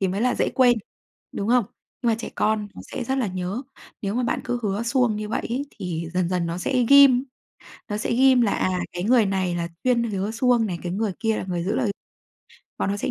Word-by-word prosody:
thì 190 Hz, -, +1 dB
mới 195 Hz, +3 st, -2 dB
là 250 Hz, +1 st, +2 dB
dễ -, -, +1 dB
quên, 245 Hz, -3 st, +5 dB, 0.5 s
đúng 200 Hz, +2 st, -3 dB
không? 245 Hz, -3 st, +4 dB, 0.4 s
Nhưng 235 Hz, -, +1 dB
mà -, -, +3 dB
trẻ 230 Hz, -, -5 dB
con 215 Hz, -1 st, 0 dB
nó -, -, -9 dB
sẽ -, -, -3 dB
rất 265 Hz, +3 st, -1 dB
là 245 Hz, -, +1 dB
nhớ. 185 Hz, +6 st, -3 dB, 0.4 s
Nếu 200 Hz, +1 st, -2 dB
mà 250 Hz, -, 0 dB
bạn 240 Hz, -, -1 dB
cứ 245 Hz, -, -1 dB
hứa 205 Hz, +1 st, -1 dB
suông 235 Hz, -2 st, +1 dB
như 210 Hz, 0 st, -4 dB
vậy -, -, -2 dB
ấy 270 Hz, +4 st, -2 dB
thì 170 Hz, -5 st, -5 dB
dần 180 Hz, -1 st, +1 dB
dần 180 Hz, -2 st, 0 dB
nó 170 Hz, +1 st, -3 dB
sẽ 250 Hz, +5 st, +1 dB
ghim, 275 Hz, -2 st, +7 dB, 0.6 s
nó 210 Hz, -, -2 dB
sẽ 215 Hz, -, -2 dB
ghim 260 Hz, 0 st, +5 dB
là, 220 Hz, -4 st, +2 dB
à, 185 Hz, -, 0 dB, 0.2 s
cái 175 Hz, -, -4 dB
người 230 Hz, -2 st, +4 dB
này 190 Hz, -2 st, 0 dB
là 170 Hz, 0 st, -2 dB, 0.2 s
chuyên 245 Hz, -2 st, +3 dB
hứa 205 Hz, -1 st, -2 dB
suông 235 Hz, -1 st, +2 dB
này, 175 Hz, -3 st, -4 dB
cái 175 Hz, -1 st, -3 dB
người 205 Hz, 0 st, -1 dB
kia 225 Hz, -1 st, +1 dB
là -, -, -3 dB
người 175 Hz, -1 st, -2 dB
giữ 200 Hz, +4 st, -1 dB
lời, 210 Hz, -, +1 dB, 0.9 s
bọn 195 Hz, -, 0 dB
nó 200 Hz, -, -1 dB
sẽ -, -, -2 dB
215 Hz, 245 wpm, -24 LUFS, 190-245 Hz, 0.9 s, ghim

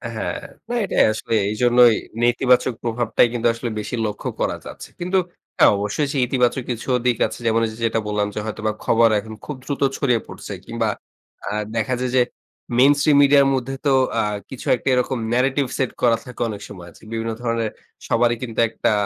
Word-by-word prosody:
হ্যাঁ, -, -, -3 dB, 0.3 s
না 240 Hz, -, -1 dB
এটাই -, -, +3 dB
আসলেই 110 Hz, +1 st, -1 dB
এইজন্যই 120 Hz, +1 st, +5 dB, 0.3 s
নেতিবাচক 125 Hz, +1 st, +3 dB
প্রভাবটাই 120 Hz, 0 st, +2 dB
কিন্তু 120 Hz, -1 st, +1 dB
আসলে 115 Hz, +1 st, -4 dB
বেশি 105 Hz, -, -4 dB
লক্ষ্য 105 Hz, -, -4 dB
করা -, -, 0 dB
যাচ্ছে। -, -, -9 dB
কিন্তু 180 Hz, +2 st, 0 dB, 0.4 s
হ্যাঁ -, -, +7 dB
অবশ্যই 105 Hz, +9 st, -1 dB
সেই 135 Hz, -, +1 dB
ইতিবাচক 125 Hz, 0 st, +1 dB
কিছুও 125 Hz, +2 st, -1 dB
দিক 125 Hz, -2 st, +2 dB
আছে। -, -, -9 dB
যেমন, 115 Hz, 0 st, +3 dB
ওইযে 110 Hz, 0 st, -6 dB
যেটা 115 Hz, 0 st, +1 dB
বললাম 105 Hz, -1 st, 0 dB
যে -, -, -2 dB
হয়তোবা 110 Hz, 0 st, -2 dB
খবর 115 Hz, 0 st, +4 dB
এখন 110 Hz, +1 st, -9 dB
খুব 150 Hz, -, -5 dB
দ্রুত 140 Hz, -, -4 dB, 0.2 s
ছড়িয়ে 125 Hz, -5 st, +2 dB
পড়ছে। -, -, -8 dB
কিংবা 115 Hz, -1 st, -1 dB, 0.6 s
আ -, -, -2 dB, 0.2 s
দেখা 115 Hz, +3 st, 0 dB
যায় 125 Hz, -1 st, -2 dB
যে 130 Hz, -, +5 dB, 0.6 s
মেইনস্ট্রিম 145 Hz, +2 st, +5 dB
মিডিয়ার 140 Hz, 0 st, +5 dB
মধ্যে 130 Hz, 0 st, -2 dB
তো 140 Hz, -, +4 dB, 0.3 s
আ -, -, +3 dB, 0.3 s
কিছু 130 Hz, -, -8 dB
একটা 120 Hz, -, -10 dB
এরকম 125 Hz, +1 st, +1 dB, 0.2 s
narrative 130 Hz, +2 st, +1 dB
সেট 130 Hz, -, 0 dB
করা 115 Hz, -2 st, +4 dB
থাকে 125 Hz, -, -9 dB
অনেক 105 Hz, -2 st, -6 dB
সময় 90 Hz, -4 st, -10 dB
যে, -, -, -22 dB
বিভিন্ন 115 Hz, 0 st, -2 dB
ধরনের 115 Hz, -2 st, -1 dB, 0.4 s
সবারই 120 Hz, +1 st, +2 dB
কিন্তু 115 Hz, -3 st, -5 dB
একটা 115 Hz, -, 0 dB
120 Hz, 185 wpm, -21 LUFS, 115-130 Hz, 0.6 s, হ্যাঁ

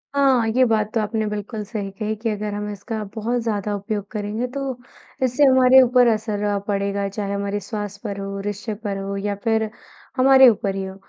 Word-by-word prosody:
हाँ। 265 Hz, -5 st, +3 dB
ये 255 Hz, -, +5 dB
बात 215 Hz, -2 st, +1 dB
तो 225 Hz, -, +1 dB
आपने 215 Hz, 0 st, -1 dB
बिल्कुल 210 Hz, +1 st, -4 dB
सही 205 Hz, -2 st, -4 dB
कहीं 215 Hz, +2 st, -3 dB
कि 230 Hz, -, 0 dB
अगर 210 Hz, 0 st, -3 dB
हम 210 Hz, 0 st, -4 dB
इसका 215 Hz, +2 st, -5 dB
बहुत 235 Hz, +2 st, -1 dB
ज़्यादा 210 Hz, -2 st, -2 dB
उपयोग 205 Hz, 0 st, -4 dB
करेंगे 215 Hz, +3 st, -3 dB
तो 275 Hz, -, -2 dB, 0.6 s
इससे 255 Hz, +3 st, +2 dB
हमारे 260 Hz, -1 st, +7 dB
ऊपर 250 Hz, -1 st, +4 dB
असर 210 Hz, -2 st, -1 dB
पड़ेगा 200 Hz, 0 st, -1 dB
चाहे 200 Hz, 0 st, -4 dB
हमारे 200 Hz, +1 st, -2 dB
स्वास्थ्य 205 Hz, 0 st, -6 dB
पर 200 Hz, -2 st, -4 dB
हो 195 Hz, 0 st, -5 dB
रिश्ते 205 Hz, +2 st, -3 dB
पर 200 Hz, -2 st, -2 dB
हो 195 Hz, 0 st, -4 dB
या 200 Hz, 0 st, -2 dB
फ़िर 220 Hz, -1 st, +1 dB, 0.5 s
हमारे 265 Hz, 0 st, +8 dB
ऊपर 200 Hz, -3 st, -1 dB
ही 195 Hz, -, -3 dB
हो। 190 Hz, 0 st, -8 dB
210 Hz, 195 wpm, -22 LUFS, 200-230 Hz, 0.6 s, हमारे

